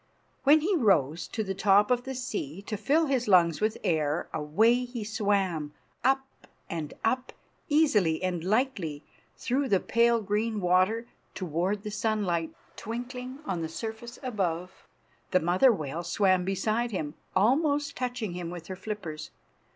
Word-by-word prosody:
When 300 +3 +7
he 375 +5 +1
rose 170 - +2
to 220 - -3
the 195 -1 -3
top 200 +3 +4
of 245 0 +1
the 265 0 -4
sea, 200 - -4
to 215 - -4
fill 285 +11 +2
his 265 -5 0
lungs 170 -4 +4
with 215 +1 +1
air, 155 -1 0
away 215 +12 +3
he 245 -2 -5
swam, 195 -8 -1 0.3
up 270 +1 +3 0.4
and 160 -3 -5
up, 255 +3 0 0.4
easily 210 - +3
and 180 -3 -1
lightly, 190 - 0 0.3
through 265 +2 0
the 195 - +4
pale 235 +2 +3
green 210 +1 -1
water, 185 +5 +2 0.3
toward 185 +4 -1
the 210 - -5
sunlight 205 -6 0 0.3
twinkling 250 +4 -6
on 180 - -2
the 160 - -3
surface 225 +7 -6
above. 180 -7 -3 0.4
The 185 - +3
mother 180 +10 +4
whale 155 -5 -3
swam 185 +1 +2
beside 215 +5 0
him, 155 -8 -3 0.2
almost 285 - +2
touching 245 -6 -3
him 175 -1 -5
with 175 -1 -7
her 185 - -4
flippers. 185 -6 -6
205 Hz, 150 wpm, -28 LUFS, 175-240 Hz, 0.4 s, When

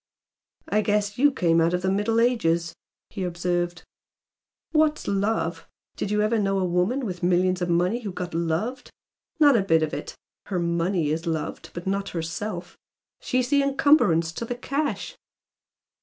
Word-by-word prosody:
"I 210 +1 +2
guess 205 +1 0
you 290 +2 +5
came 170 -9 +2
out 165 +2 +2
of 180 - -3
the 190 - +1
Middle 210 +3 +1
Ages!" 170 -9 +1 0.4
he 195 - -4
observed 175 0 -2 0.9
"What's 310 -1 +2
'love'? 195 -5 -1 0.3
Did - - -3
you 210 0 +1
ever 220 +1 +1
know 195 -1 +1
a 190 - +1
woman 180 +10 0
with 180 -4 -5
millions 180 +1 +2
of 175 - -1
money 180 +8 +1
who 205 -4 -5
got 180 -1 -5
'loved'? 170 +10 -2 0.5
Not 290 -4 +6
a 225 - +4
bit 165 -4 +3
of 155 - -2
it! 145 - -5 0.3
Her 190 - -2
MONEY 170 -1 0
is 165 +2 -2
loved 160 -2 -3
but 175 - -6
not 195 +1 -1
herself. 175 +3 -4 0.4
She's 255 0 -1
the 285 -1 +4
encumbrance 275 - +3
to 165 - -5
the 245 - -4
cash." 280 +4 -3
190 Hz, 165 wpm, -25 LUFS, 170-225 Hz, 0.9 s, Not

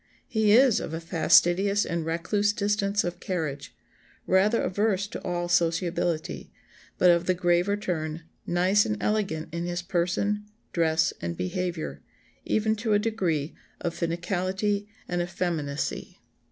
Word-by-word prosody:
He 220 -3 +2
is 250 0 +6
of 160 - -5
a - - -3
fastidious 180 +4 +3
and 170 -1 -2
recluse 170 +6 0
distance 205 0 0
of 175 0 -4
carriage, 155 -8 -4 0.5
rather 205 +5 +3
averse 200 +1 +1
to - - -6
all 175 0 -2
sociability, 170 -1 0 0.5
but 180 -1 +6
of 170 0 +1
the 185 - +3
graver 175 +3 +2
turn, 160 -5 -3 0.2
nice 185 +4 +3
and 105 - -2
elegant 190 -7 -1
in 170 0 -2
his 175 0 -3
person, 190 +4 0 0.3
dress, 160 -1 +2
and 85 0 -4
behaviour, 170 - -3 0.4
even 220 0 +1
to 220 0 0
a - - +6
degree 180 -9 -1 0.3
of 170 -2 -2
finicality 185 +4 -1 0.2
and 175 0 -1
effeminacy." 165 -5 -3
180 Hz, 135 wpm, -27 LUFS, 170-205 Hz, 0.5 s, is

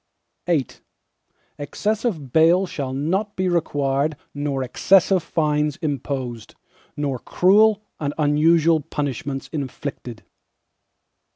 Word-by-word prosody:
VIII 160 -7 +2 0.9
Excessive 180 - -2
bail 170 +4 +5
shall 140 -7 -4
not 185 +10 -1
be 185 0 0
required 145 -3 0 0.2
nor 145 -2 -2
excessive 185 +7 +3
fines 150 -2 0
imposed, 135 - -4 0.4
nor 140 -3 -2
cruel 210 - +3 0.2
and 145 -2 -1
unusual 160 +2 +3
punishments 140 -2 -4
inflicted. 135 -5 -6
150 Hz, 90 wpm, -22 LUFS, 140-175 Hz, 0.9 s, bail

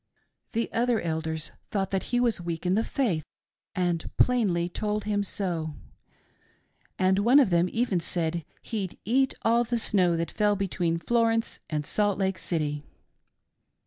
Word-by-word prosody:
"The 230 0 0
other 235 -1 +2
Elders 160 -1 -2 0.2
thought 195 -2 -1
that 190 -1 -1
he 245 - +2
was 235 -6 +1
weak 170 0 -4
in 180 - +2
the 220 +3 +2
faith, 205 - 0 0.5
and 175 -3 0
plainly 200 -9 +3
told 210 +3 -2
him 205 -1 0
so; 170 -6 -3 1.2
and 190 +1 +3
one 240 +7 +6
of 245 -10 +4
them 175 +1 +3
even 230 -6 +1
said 170 0 -1 0.2
he'd 200 -5 -4
eat 265 +5 +2
all 235 +1 +4
the 240 0 -1
snow 180 -6 +3
that 165 0 -2
fell 210 -1 +2
between 175 -4 -1
Florence 225 +4 +1
and 150 -2 -2
Salt 205 +2 +1
Lake 190 -1 0
City. 150 -3 -1
190 Hz, 150 wpm, -27 LUFS, 170-225 Hz, 1.2 s, one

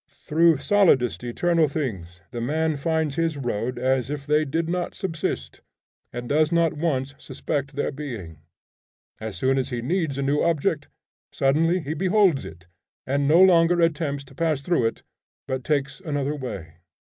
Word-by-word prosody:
Through 165 0 +2
solidest 140 - +3
eternal 165 +6 +2
things 95 - -5
the 120 -1 -4
man 155 +5 0
finds 155 0 -1
his 165 -2 0
road 120 -1 -2
as 130 0 0
if 145 -1 -4
they 150 +1 +2
did 160 +3 -1
not 175 +1 -2
subsist, 165 -5 -4 0.5
and 120 0 -6
does 155 +3 +2
not 170 -1 +2
once 140 -4 -1
suspect 140 -2 -4
their 145 - -1
being. 115 - -7 0.8
As 110 -4 -6
soon 135 +7 +2
as 130 - -2
he 120 -2 -3
needs 160 -1 -1
a 140 - -1
new 140 +2 +1
object, 160 -2 0 0.4
suddenly 165 +6 +2
he 155 0 -4
beholds 185 -3 +2
it, 85 +3 -11 0.4
and 140 +1 0
no 160 +4 +5
longer 175 -1 +5
attempts 155 -4 0
to 140 - -17
pass 160 -4 0
through 140 -6 +1
it, 115 - -6 0.4
but 130 -1 -3
takes 140 +1 -1
another 145 -5 -2
way. 95 - -7
145 Hz, 160 wpm, -24 LUFS, 130-165 Hz, 0.8 s, no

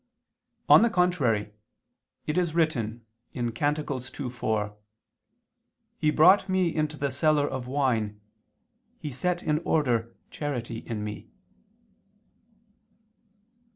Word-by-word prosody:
On - - +8
the 235 - +4
contrary, 140 - +1 0.7
It 150 - -2
is 175 -3 0
written 120 -9 0 0.3
(Cant 120 -2 -2 0.2
2:4): 125 -7 -3 1.2
"He 155 - +2
brought 185 +6 +5
me 185 -3 +1
into 155 -1 -1
the 140 -1 -1
cellar 145 +2 +2
of 130 -2 -5
wine, 120 -6 0 0.8
he 150 - -6
set 175 +7 -1
in 150 0 +1
order 120 -9 0 0.2
charity 120 -6 -4
in 110 -3 -5
me." 105 0 -7
140 Hz, 100 wpm, -27 LUFS, 115-155 Hz, 1.2 s, On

